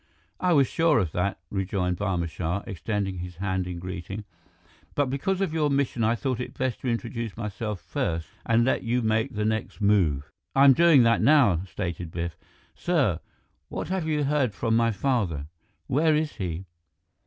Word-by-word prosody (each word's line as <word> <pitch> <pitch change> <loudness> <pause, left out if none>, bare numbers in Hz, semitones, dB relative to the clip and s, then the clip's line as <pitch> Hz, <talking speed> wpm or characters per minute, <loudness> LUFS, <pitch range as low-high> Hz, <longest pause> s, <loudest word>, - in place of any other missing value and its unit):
"I 180 - +2
was 140 -3 +5
sure 165 +1 +2
of 90 -8 +1
that," 90 +4 -1
rejoined 95 -2 -1
Barma 90 -4 -1
Shah, 85 +3 -3
extending 95 0 -3
his 90 0 -6
hand 95 0 -2
in 90 -1 -5
greeting, 90 +3 -6 0.7
"but 140 -3 +1
because 185 +8 -1
of 190 -5 0
your 155 -2 +2
mission 140 -4 0
I 110 +2 +3
thought 125 +3 -2
it 125 - -6
best 130 -2 -1
to - - -5
introduce 115 -2 -3
myself 105 -2 -4
first 80 -1 -2 0.2
and 115 0 +3
let 130 - +1
you 120 +1 0
make 110 +3 0
the 105 0 0
next 110 0 -2
move." 90 -10 +2 0.2
"I'm 135 0 +8
doing 160 -4 +6
that 115 0 +3
now," 115 - +5
stated 85 -3 -4
Biff. 85 0 -4 0.4
"Sir 140 - +1 0.5
what - - -4
have 185 -4 -1
you 150 -2 +1
heard 140 -7 +1
from 115 0 +1
my 115 0 +3
father? 100 - 0 0.4
Where 155 +3 +3
is 155 -1 -1
he?" 90 -3 -4
110 Hz, 175 wpm, -26 LUFS, 90-135 Hz, 0.7 s, I'm